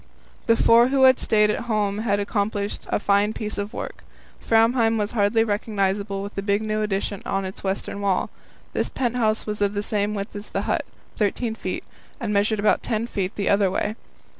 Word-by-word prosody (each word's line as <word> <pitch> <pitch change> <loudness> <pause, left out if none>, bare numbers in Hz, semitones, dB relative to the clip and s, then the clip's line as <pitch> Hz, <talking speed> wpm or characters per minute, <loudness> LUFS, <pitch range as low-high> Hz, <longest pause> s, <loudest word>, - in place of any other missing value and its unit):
The 230 - +5
four 235 +2 +6
who 265 0 +2
had 260 0 +7
stayed 210 -1 +3
at 235 - -3
home 210 -3 0
had 205 -2 +1
accomplished 205 0 -2
a - - +1
fine 205 +1 +2
piece 215 -2 -4
of 205 +1 -3
work. - - -6 0.4
Framheim 225 0 +3
was 210 0 -1
hardly 225 0 +3
recognizable 200 -2 -1
with 200 - -7
the 195 - -3
big 200 +1 0
new 215 0 -1
addition 200 -1 -2
on 195 0 -1
its 190 - -8
western 195 +1 -3
wall. 195 -2 0 0.4
This - - -1
pent 245 -2 -1
house 220 -3 +1
was 210 -1 -4
of 205 0 +1
the 205 - -1
same 210 0 -1
width 200 +1 -5
as 205 +1 -7
the - - -2
hut - - -1 0.3
13 220 +2 0
feet 225 - -4 0.4
and 220 -3 -2
measured 205 +2 +2
about 210 - +3
10 225 -1 -1
feet 195 -4 -3
the 200 - -2
other 200 -1 +4
way. 205 +3 -1
210 Hz, 200 wpm, -24 LUFS, 200-225 Hz, 0.4 s, had